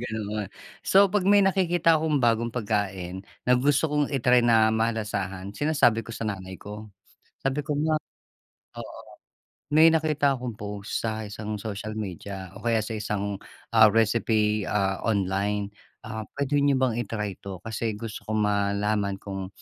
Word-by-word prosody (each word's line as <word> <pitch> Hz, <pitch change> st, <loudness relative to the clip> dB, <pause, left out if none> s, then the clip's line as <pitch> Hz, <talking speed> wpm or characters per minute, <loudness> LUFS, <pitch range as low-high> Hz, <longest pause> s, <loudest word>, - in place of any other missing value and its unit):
ganoon. 110 Hz, -3 st, -4 dB, 0.3 s
So, 195 Hz, +1 st, +5 dB
pag 205 Hz, -3 st, +2 dB
may 205 Hz, -1 st, +6 dB
nakikita 175 Hz, -4 st, +3 dB
akong 155 Hz, -2 st, +1 dB
bagong 115 Hz, -1 st, +2 dB
pagkain 100 Hz, -5 st, -2 dB, 0.2 s
na 125 Hz, -, +3 dB
gusto 145 Hz, +3 st, +2 dB
kong 150 Hz, -1 st, +2 dB
i-try 125 Hz, -3 st, +3 dB
na 110 Hz, -2 st, +4 dB
malasahan 105 Hz, -4 st, -2 dB
sinasabi 135 Hz, -3 st, +2 dB
ko 115 Hz, -, -13 dB
sa 115 Hz, -, -5 dB
nanay 95 Hz, -3 st, -5 dB
ko, 105 Hz, +2 st, -9 dB, 0.6 s
sabi 135 Hz, +2 st, +1 dB
ko, 145 Hz, 0 st, -3 dB
"Ma," 155 Hz, +1 st, +1 dB, 0.8 s
oo. -, -, -8 dB, 0.7 s
"May 155 Hz, +2 st, +8 dB
nakita 155 Hz, -3 st, +2 dB
akong 125 Hz, -2 st, -5 dB
post 105 Hz, 0 st, -4 dB
sa 110 Hz, -1 st, -2 dB
isang 105 Hz, +1 st, -5 dB
social 105 Hz, +1 st, -5 dB
media 95 Hz, -2 st, -6 dB
o 100 Hz, -, -10 dB
kaya 115 Hz, -1 st, +2 dB
sa 110 Hz, -, -6 dB
isang, 100 Hz, -1 st, -3 dB, 0.3 s
ah, 110 Hz, -1 st, +8 dB
recipe, 110 Hz, -1 st, +2 dB
ah, 95 Hz, -2 st, 0 dB
online, 100 Hz, 0 st, 0 dB, 0.3 s
ah, 110 Hz, 0 st, -5 dB
puwede 140 Hz, +1 st, +1 dB
niyo 140 Hz, -1 st, +3 dB
bang 120 Hz, -3 st, +1 dB
i-try 105 Hz, -3 st, -4 dB
to 95 Hz, -2 st, -7 dB
kasi 110 Hz, 0 st, -3 dB
gusto 110 Hz, 0 st, -7 dB
ko 110 Hz, -, -1 dB
malaman 100 Hz, -1 st, +1 dB
kung 95 Hz, -2 st, -5 dB
110 Hz, 155 wpm, -26 LUFS, 100-130 Hz, 0.8 s, May